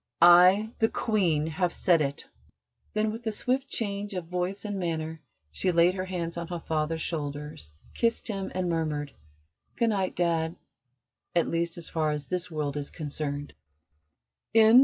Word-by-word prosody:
I, 180 +5 +7
the 225 - +4
Queen, 175 -9 +1
have 170 +3 0
said 170 -3 +3
it!" 140 -1 -2 0.7
Then, 215 0 +2
with 225 +2 -7
a - - +2
swift 255 +5 0
change 205 -4 -2
of 180 -2 -3
voice 180 +4 -3
and 205 -2 -3
manner, 160 -2 -3 0.3
she 180 - 0
laid 170 +1 +5
her 185 0 -3
hands 175 -2 -3
on 170 -1 -4
her 175 -1 -4
father's 160 0 -1
shoulders, 145 - -5 0.2
kissed 230 -1 0
him, 195 -4 -3
and 185 -1 0
murmured: 155 -4 -1 0.6
"Good 235 - +2
night, 195 -3 0
Dad 165 -1 +1 0.8
at 170 - +3
least 170 0 -1
as 170 - -6
far 155 -2 0
as 150 -1 -2
this 180 +2 -2
world 150 -3 -2
is 145 -1 -3
concerned." 145 -2 -3
170 Hz, 160 wpm, -28 LUFS, 155-190 Hz, 0.8 s, I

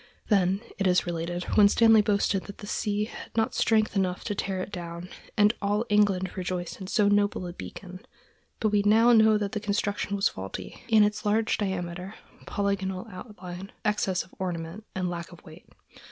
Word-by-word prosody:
Then, 195 -1 +3 0.2
it 195 - +2
is 180 0 +3
related, 175 +1 -3
Winstanley 220 +2 +6
boasted 200 -2 +1
that 200 - -9
the - - -9
sea 205 0 -1
had 225 - -11
not 225 - +2
strength 215 -1 +2
enough 185 -2 0
to 210 - -2
tear 190 -1 -2
it 185 - -5
down, 175 -1 -7 0.3
and 210 +1 +5
all 205 +3 0
England 200 -3 +2
rejoiced 180 0 -4
in 190 - -6
so 210 +1 +2
noble 205 -2 +2
a 175 - -6
beacon; 185 +2 -9 0.6
but 215 - +2
we 205 -1 +3
now 225 +3 +5
know 220 -1 +6
that 205 -1 -2
the 215 - -2
construction 205 -1 -1
was 195 - +3
faulty, 95 +1 -7
in 220 -2 +6
its 210 +1 0
large 215 +2 +2
diameter, 185 0 -3 0.3
polygonal 195 -2 -1
outline, 185 -2 -9
excess 200 -3 +1
of - - -21
ornament, 175 +2 -4
and 185 -1 -1
lack 170 0 -5
of 175 - -14
weight. 160 +3 -14
200 Hz, 180 wpm, -27 LUFS, 180-210 Hz, 0.6 s, Winstanley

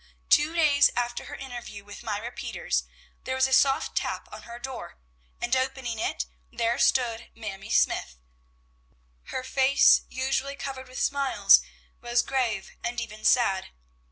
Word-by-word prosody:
Two 300 +3 +4
days 295 -4 +5
after 240 0 -2
her - - -8
interview 240 -6 -8
with 205 0 -11
Myra 215 +2 -4
Peters, - - -2 0.4
there 260 - -2
was 260 0 +3
a 265 - -1
soft 270 0 +3
tap - - -2
on - - -8
her 235 - -7
door, 245 - -8 0.4
and 240 +2 0
opening 260 -3 -2
it, 60 - -1 0.3
there 235 0 0
stood 235 -3 +2
Mamie 215 -2 -7
Smythe! 60 - +1 1.1
Her 260 - -4
face, 265 +1 +5
usually 270 +1 -1
covered 265 -2 -6
with 255 - -8
smiles, 280 -1 +4 0.4
was 240 0 +1
grave 235 -7 -1
and 235 0 -2
even 215 -2 -7
sad. 195 -6 +3
245 Hz, 145 wpm, -27 LUFS, 230-265 Hz, 1.1 s, days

